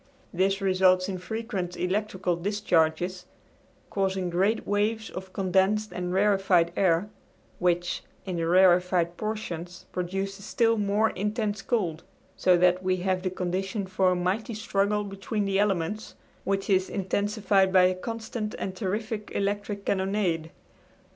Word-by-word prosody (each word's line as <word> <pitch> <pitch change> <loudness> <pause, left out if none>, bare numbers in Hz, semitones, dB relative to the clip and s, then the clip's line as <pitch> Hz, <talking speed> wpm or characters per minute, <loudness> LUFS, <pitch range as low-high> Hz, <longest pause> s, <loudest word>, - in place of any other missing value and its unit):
This 195 +3 +1
results 185 -1 +3
in 190 -2 -4
frequent 195 -2 -4
electrical 185 -1 -1
discharges, 180 -2 0 0.6
causing 190 -2 -1
great 195 +6 +1
waves 215 +2 0
of 190 0 -7
condensed 195 +2 +1
and 180 0 -3
rarefied 190 -3 +3
air, 185 +2 +2 0.5
which, 175 0 0 0.2
in 185 -3 -3
the 165 -1 -1
rarefied 180 -1 +4
portions, 180 -5 -5
produces 195 +2 -3
still 230 +2 +2
more 205 +2 +2
intense 210 +1 -2
cold; 180 -9 -1 0.3
so 180 -1 +4
that 180 +1 +3
we 185 0 +1
have 185 0 -1
the 185 - -1
conditions 185 +2 -3
for 190 -1 +3
a 180 - +2
mighty 195 +6 -1
struggle 210 -1 0
between 200 +1 -3
the 195 0 +1
elements, 205 +1 -1 0.3
which 195 0 -1
is 190 -2 +2
intensified 200 0 +1
by 185 -1 +6
a 185 0 +4
constant 220 +2 -5
and 190 - -4
terrific 210 +2 -3
electric 200 0 -2
cannonade. 190 -4 0
190 Hz, 135 wpm, -27 LUFS, 180-205 Hz, 0.6 s, by